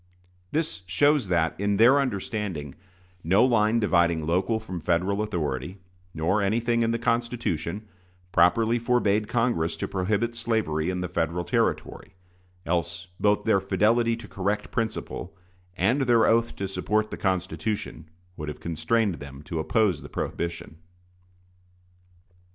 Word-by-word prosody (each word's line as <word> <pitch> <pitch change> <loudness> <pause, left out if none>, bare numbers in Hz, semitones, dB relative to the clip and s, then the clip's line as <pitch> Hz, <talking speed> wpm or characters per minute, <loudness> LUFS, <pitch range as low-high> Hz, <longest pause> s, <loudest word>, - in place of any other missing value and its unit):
This 150 - -1
shows 145 +4 +3
that, 85 -3 +1
in 100 0 +1
their 125 +6 +6
understanding, 100 - -3 0.5
no 95 +9 +4
line 115 -2 +3
dividing 85 -6 +2
local 95 +7 +1
from 95 -6 -7
Federal 90 +5 +1
authority, 85 -4 -3 0.3
nor 85 +6 0
anything 115 +4 +1
in 115 - +2
the 115 - +1
Constitution, 115 -6 -2 0.4
properly 115 +7 +3
forbade 110 -3 +1
Congress 115 -9 0
to - - -3
prohibit 105 +5 -1
slavery 110 -10 -1
in 90 -1 -2
the 90 - -2
Federal 85 0 -1
territory; 95 +3 -1 0.5
else 85 0 -2
both 105 0 +2
their 105 -4 +3
fidelity 115 +4 +2
to 115 - -10
correct 100 +2 -2
principle, 110 -5 -4 0.4
and 115 +11 +2
their 120 -4 +4
oath 115 +1 +2
to 95 - -3
support 105 +2 -1
the - - -3
Constitution, 95 -3 -2 0.3
would 75 -1 -5
have 75 - -7
constrained 85 +5 0
them 70 0 -10
to 80 +2 -4
oppose 95 -1 +1
the - - -10
prohibition. 85 -1 -4
100 Hz, 135 wpm, -26 LUFS, 85-115 Hz, 0.5 s, their